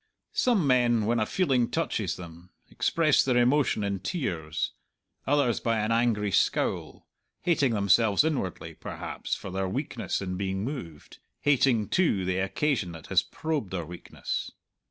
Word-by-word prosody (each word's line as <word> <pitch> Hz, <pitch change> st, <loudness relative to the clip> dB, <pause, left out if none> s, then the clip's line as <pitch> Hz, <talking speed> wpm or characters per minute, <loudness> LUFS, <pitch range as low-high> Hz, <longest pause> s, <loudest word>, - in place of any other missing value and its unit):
Some 230 Hz, -10 st, +2 dB
men, 120 Hz, -4 st, +3 dB
when 115 Hz, +2 st, +1 dB
a 110 Hz, -, 0 dB
feeling 130 Hz, -10 st, +1 dB
touches -, -, -1 dB
them, 85 Hz, 0 st, -11 dB, 0.2 s
express 155 Hz, -3 st, +3 dB
their 125 Hz, -2 st, +2 dB
emotion 125 Hz, -2 st, +3 dB
in 100 Hz, -1 st, -1 dB
tears; 90 Hz, -, -2 dB, 0.6 s
others 140 Hz, -4 st, +2 dB
by 115 Hz, -1 st, 0 dB
an 110 Hz, +1 st, 0 dB
angry 115 Hz, -3 st, +2 dB
scowl -, -, 0 dB, 0.4 s
hating 145 Hz, -9 st, +2 dB
themselves 100 Hz, +3 st, +4 dB
inwardly, 145 Hz, -, -2 dB
perhaps, -, -, -5 dB
for 95 Hz, -, -8 dB
their 95 Hz, 0 st, -1 dB
weakness -, -, -2 dB
in 90 Hz, -2 st, -4 dB
being 95 Hz, 0 st, -2 dB
moved, 105 Hz, -, -7 dB, 0.2 s
hating, 130 Hz, -6 st, +3 dB
too, 130 Hz, -, +2 dB
the 95 Hz, 0 st, 0 dB
occasion 95 Hz, -, 0 dB
that 80 Hz, -, -10 dB
has -, -, +6 dB
probed 155 Hz, -10 st, -3 dB
their 90 Hz, -3 st, -3 dB
weakness. 85 Hz, +2 st, -5 dB
110 Hz, 145 wpm, -27 LUFS, 95-135 Hz, 0.6 s, has